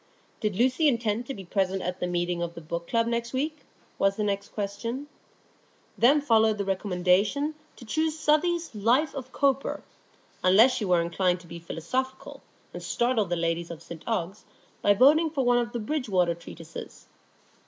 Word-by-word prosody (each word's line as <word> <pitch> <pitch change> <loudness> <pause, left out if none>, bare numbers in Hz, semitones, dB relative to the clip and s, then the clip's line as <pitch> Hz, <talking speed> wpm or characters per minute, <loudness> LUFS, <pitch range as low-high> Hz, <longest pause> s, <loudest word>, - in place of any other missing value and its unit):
Did 210 -4 -1
Lucy 255 - +3
intend 235 -3 0
to 275 - -3
be 195 -2 -9
present 190 0 -1
at 180 0 -3
the 180 - -1
meeting 175 0 -1
of 170 0 -4
the - - -7
Book 170 +2 -5
Club 230 -1 +2
next 235 +1 -2
week? 305 +4 -1 0.4
was 195 0 +3
the 210 - -2
next 200 -1 -2
question. 225 +6 -4 0.9
Then 280 +5 +5
followed 220 -5 +3
the 200 - -2
recommendation 195 - +1 0.2
to 240 - -12
choose 315 +7 0
Southey's 325 +2 +1
"Life 240 +9 +2
of 260 -2 -7
Cowper," 275 -1 0 0.6
unless 210 +8 +6
she 235 -4 -2
were 180 -2 +3
inclined 180 +1 0
to - - -16
be 170 +1 -8
philosophical, 255 +11 -4 0.3
and - - -6
startle 240 -3 +1
the 175 -1 -2
ladies 165 0 -1
of 170 -1 -8
St 165 -2 -9
Ogg's 200 -3 -2 0.4
by 205 - +4
voting 305 +8 +5
for 280 -4 -1
one 245 0 +4
of 235 -1 -2
the 240 - -3
Bridgewater 210 - 0
Treatises. 165 -1 -10
215 Hz, 175 wpm, -27 LUFS, 180-260 Hz, 0.9 s, unless